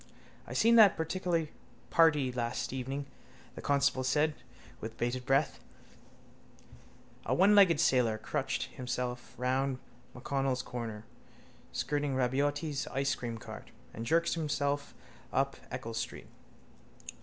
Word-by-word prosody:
—I - - -6
seen 230 +1 +5
that 210 -4 +8
particular 165 0 -1 0.4
party 150 -6 +4
last 120 0 -2
evening, 135 +2 -3 0.5
the - - -8
constable 140 -2 +2
said 150 +4 +2 0.5
with 110 +1 -7
bated 125 +1 -2
breath. 135 +2 +2 1.7
A - - +2
onelegged 195 -3 +6
sailor 125 -8 +3
crutched 130 +4 -2
himself 125 -1 -4
round 130 +1 0 0.4
MacConnell's 135 0 -1
corner, 115 -3 -6 0.7
skirting 145 -1 -1
Rabaiotti's 140 +3 0
icecream 135 -4 -2
car, - - -9 0.3
and 115 - -5
jerked 165 +7 +2
himself 145 -3 -1 0.4
up - - +1
Eccles 115 0 -4
street. - - -5
135 Hz, 110 wpm, -32 LUFS, 125-150 Hz, 1.7 s, that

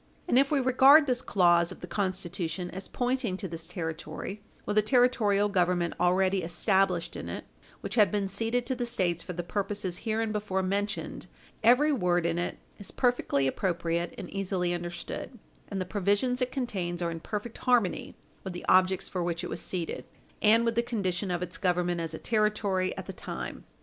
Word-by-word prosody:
And 245 - +5
if 275 0 +3
we 295 - +2
regard 265 +4 +7
this 250 -3 0
clause 175 -3 +3
of - - -10
the - - -5
Constitution 185 -2 -3
as 190 +1 -6
pointing 245 -6 -1
to 195 - -4
this 165 -1 -7
Territory, 170 +4 -5 0.2
with 210 - -2
a - - +5
Territorial 215 -4 +3
Government 180 -3 +1
already 185 +2 +3
established 180 +1 +1
in - - -6
it, - - -6 0.4
which - - -5
had 210 -5 +5
been 205 -2 -1
ceded 225 +5 -1
to 260 - -1
the 245 -1 -2
States 180 -8 0
for 180 - -5
the 175 +1 -4
purposes 195 -1 -2
hereinbefore 215 -3 -1
mentioned 205 +3 -2 0.4
every 250 +7 +5
word 180 - +1
in 170 0 0
it 175 - -3 0.2
is 200 - -5
perfectly 245 - +1
appropriate 170 +2 -1
and - - -6
easily 185 -3 -1
understood, 175 +8 -5 0.3
and 195 - -3
the 185 - -1
provisions 205 +6 +1
it 250 0 0
contains 185 -10 -2
are 170 - -1
in 165 - -5
perfect 210 +6 -5
harmony 240 -7 +1 0.3
with 190 - -5
the 175 - -7
objects 185 0 +4
for 180 - -3
which 170 -1 -2
it - - -5
was - - -3
ceded, 175 -3 -3 0.4
and 225 +2 +5
with 230 - +2
the 235 - +2
condition 200 -6 -2
of 175 0 -1
its 180 0 -5
government 175 -2 +1
as 165 -1 -4
a - - -5
Territory 210 -4 +1
at - - -5
the - - -6
time. - - -6
195 Hz, 185 wpm, -29 LUFS, 175-225 Hz, 0.4 s, regard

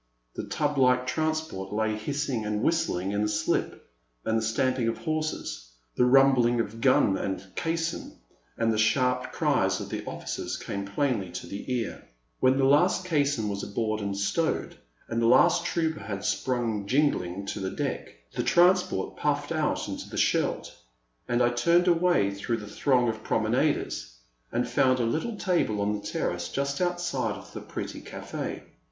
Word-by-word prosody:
The - - -5
tub 145 -2 -1
like 125 -1 +4
transport 155 -11 -2
lay 110 +1 0
hissing 130 +1 -2
and 105 +1 -2
whistling 100 - +1
in 100 0 0
the 105 - +1
slip, 105 0 -1 0.4
and 110 - +1
the 115 - +2
stamping 120 +2 +1
of 115 - -1
horses, 155 - -3 0.3
the 125 - +4
rumbling 125 -2 +5
of 115 0 -3
gun 115 -7 +4
and 95 -1 -3
caisson, 165 0 -2 0.4
and 115 -1 +2
the 110 - -1
sharp 125 +3 +2
cries - - +1
of - - -6
the - - -4
officers - - -4
came 100 0 -4
plainly 105 -3 0
to - - -5
the 100 +6 -6
ear. 120 -3 -2 0.4
When 130 +1 +4
the 135 - +2
last 175 +6 +4
caisson 140 -9 +1
was 100 -1 -3
aboard 110 +1 -2
and 100 -1 -3
stowed, 160 +11 -1 0.3
and 115 - -1
the 115 - +3
last 170 +7 +5
trooper 160 -2 0
had 100 -2 -5
sprung 115 -5 -1
jingling 100 -9 +1
to 100 - -4
the 95 -1 -2
deck, - - -3 0.3
the - - -1
transport 175 - +3
puffed - - -1
out - - 0
into - - -6
the - - -7
Scheldt, - - +1 0.5
and 120 0 +2
I 120 - +4
turned 170 +9 +3
away 175 - +3
through 110 +4 -2
the 105 - -8
throng 125 +3 +2
of 110 -1 -2
prom - - 0
enaders, - - 0 0.4
and 120 +1 0
found 130 +1 +3
a - - +2
little 160 - -1
table 175 - +1
on 100 +1 +1
the 105 - -4
terrace, 90 -4 -2
just 140 +3 -2
outside 175 -11 -1
of 100 - -12
the - - -6
pretty - - -6
cafi6. - - -6
120 Hz, 170 wpm, -27 LUFS, 105-145 Hz, 0.5 s, rumbling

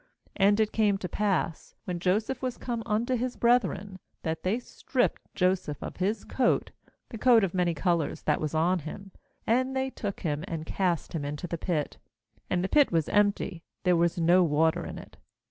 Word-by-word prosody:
^And 205 +2 +4
it 215 -1 +2
came 210 -3 +2
to 185 - -4
pass, 190 -6 -1
when 180 -2 -3
Joseph 215 +8 0
was 255 -2 -3
come 235 -2 -3
unto 225 +4 0
his 250 +1 -2
brethren, 225 -5 +1 0.2
that 160 0 -2
they 190 +5 0
stripped 250 +1 -1
Joseph 180 -5 +1
of - - -7
his 205 +3 -1
coat, 255 -2 +1 0.4
the 225 - -7
coat 240 -3 +6
of 190 - 0
many 175 -2 +1
colours 170 -3 0
that 150 - +1
was 155 0 -2
on 175 +3 +2
him; 195 +6 -8 0.4
^and 255 +3 +2
they 265 0 -1
took 205 -5 -5
him, 150 -2 -2
and 165 -5 -4
cast 175 -1 -1
him 160 -3 -2
into 145 +3 -4
the 170 -1 -4
pit 155 -5 -2 0.2
— - - -39
and 180 -1 +1
the - - +1
pit 290 +6 +4
was 165 -4 +1
empty, 205 -4 +1 0.2
there 180 -2 +4
was 170 +1 +2
no 175 +2 +5
water 160 0 +2
in - - -7
it. - - -12
185 Hz, 195 wpm, -28 LUFS, 165-220 Hz, 0.4 s, coat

